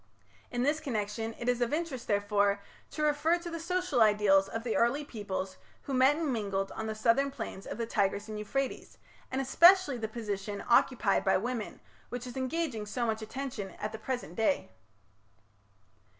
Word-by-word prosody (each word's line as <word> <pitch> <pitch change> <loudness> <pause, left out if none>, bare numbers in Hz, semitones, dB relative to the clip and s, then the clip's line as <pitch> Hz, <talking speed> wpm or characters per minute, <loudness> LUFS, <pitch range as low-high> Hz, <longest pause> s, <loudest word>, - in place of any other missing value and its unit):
In 245 0 -1
this 295 +3 +2
connection 225 -3 -3
it 240 - -5
is 245 0 +1
of 240 - +1
interest, 300 -6 -3
therefore, 205 -1 +2 0.3
to 305 - -3
refer 300 +3 +3
to 345 0 -7
the 335 - -4
social 350 -6 0
ideals 205 -2 +5
of 225 - -4
the 235 -2 -1
early 275 +5 +2
peoples 195 -6 -5 0.3
who 275 - -5
met 260 +3 +5
and 310 -4 -1
mingled 195 -3 -2
on 220 - -4
the 220 - -3
southern 235 +5 +3
plains 225 -7 -7
of - - -5
the 230 - -1
Tigris 205 -2 0
and 215 -1 -5
Euphrates, 270 +6 -3 0.3
and 260 - -2
especially 335 +1 +6
the 220 - -2
position 205 -3 -4
occupied 235 -3 +3
by 190 - +4
women, 230 +1 -4 0.3
which 245 0 -5
is 245 - -8
engaging 260 -4 -2
so 240 +3 -1
much 220 -1 -1
attention 220 -5 -5
at 210 - -3
the 220 - -7
present 240 -7 -4
day. 225 -4 +1
235 Hz, 180 wpm, -31 LUFS, 210-275 Hz, 0.3 s, especially